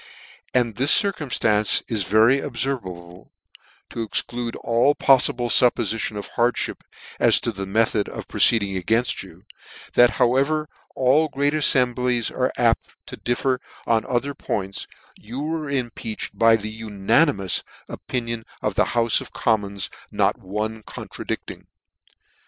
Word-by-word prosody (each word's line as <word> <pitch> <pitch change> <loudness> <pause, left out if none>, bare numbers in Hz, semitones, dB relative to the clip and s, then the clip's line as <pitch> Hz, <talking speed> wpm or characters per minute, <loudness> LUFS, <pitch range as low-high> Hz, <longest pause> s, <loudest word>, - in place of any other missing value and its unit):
" - - -25
And 120 -4 +1
this 135 +4 +2
circumftance 125 - +1
is 110 -3 0
very 110 +8 +4
obfervable, 95 -10 -5 0.6
(to 115 - -4
exclude 120 +1 -2
all 120 +5 +2
pofiible 130 -2 +3
fuppofition 110 -3 +2
of 100 - -6
hardmip, 120 +1 0 0.4
as - - +4
to 115 - -1
the 100 -2 -6
method 110 0 +1
of - - -8
proceeding 100 -4 +3
againft 115 +7 +1
you) - - -14 0.5
that 120 0 +6
however 140 +5 +1 0.3
all 135 +5 +3
great 145 0 0
afiemblies 125 -5 +2
are - - -1
apt - - +1
to - - -8
differ 125 +1 -1 0.3
en 115 -1 +2
other 125 +3 -1
points, 100 -6 -4 0.3
you 120 +5 -8
were 155 -1 -3
impeached 120 -5 -4
by 115 0 +5
the 110 0 -6
unani 110 +9 +2
mous 95 -2 -1 0.2
opinion 115 -2 -4 0.2
of - - 0
the - - +2
Houfe 115 -1 +3
of - - -10
Commons, 100 -4 -1 0.2
not - - 0
one 105 +3 -4
contradicting. - - -7
115 Hz, 135 wpm, -22 LUFS, 105-130 Hz, 0.6 s, that